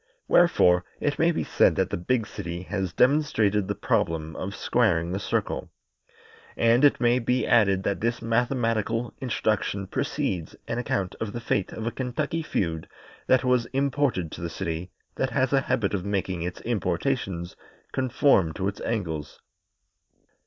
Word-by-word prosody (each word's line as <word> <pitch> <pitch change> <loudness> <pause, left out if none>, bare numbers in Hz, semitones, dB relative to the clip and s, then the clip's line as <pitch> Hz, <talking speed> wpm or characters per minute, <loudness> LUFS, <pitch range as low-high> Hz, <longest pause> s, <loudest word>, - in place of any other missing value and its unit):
Wherefore, 90 - +5 0.2
it 145 - -1
may 165 - +4
be - - -1
said - - +3
that - - 0
the - - 0
big 115 +6 0
city 90 -5 -6
has 95 -2 -3
demonstrated 110 - +2
the - - -2
problem 80 -1 -1
of 100 +2 -5
squaring 90 -8 +1
the 95 - -2
circle. - - -2 0.9
And 115 +3 +4
it 145 - +5
may 120 +1 +3
be 125 +1 0
added 95 -4 +3
that 100 - -1
this 115 +2 0
mathematical 115 -1 0
introduction 110 -5 -1
precedes 130 - -2
an - - -2
account 100 -6 -1
of 105 -2 -4
the 120 - -3
fate 105 -4 -1
of 110 - -6
a 115 - -1
Kentucky 140 +7 -2
feud 80 - -2 0.4
that 130 - +4
was 125 -2 +2
imported 135 - 0
to - - -8
the 85 - -3
city 85 0 -4 0.3
that 130 - 0
has 130 +1 +1
a 135 - +4
habit 115 -7 0
of 95 -3 -1
making 95 -3 -2
its 90 +1 -4
importations 95 -3 -2 0.4
conform 130 - +2
to 95 +3 -2
its 100 0 -4
angles. 80 -10 -3
110 Hz, 160 wpm, -26 LUFS, 90-125 Hz, 0.9 s, Wherefore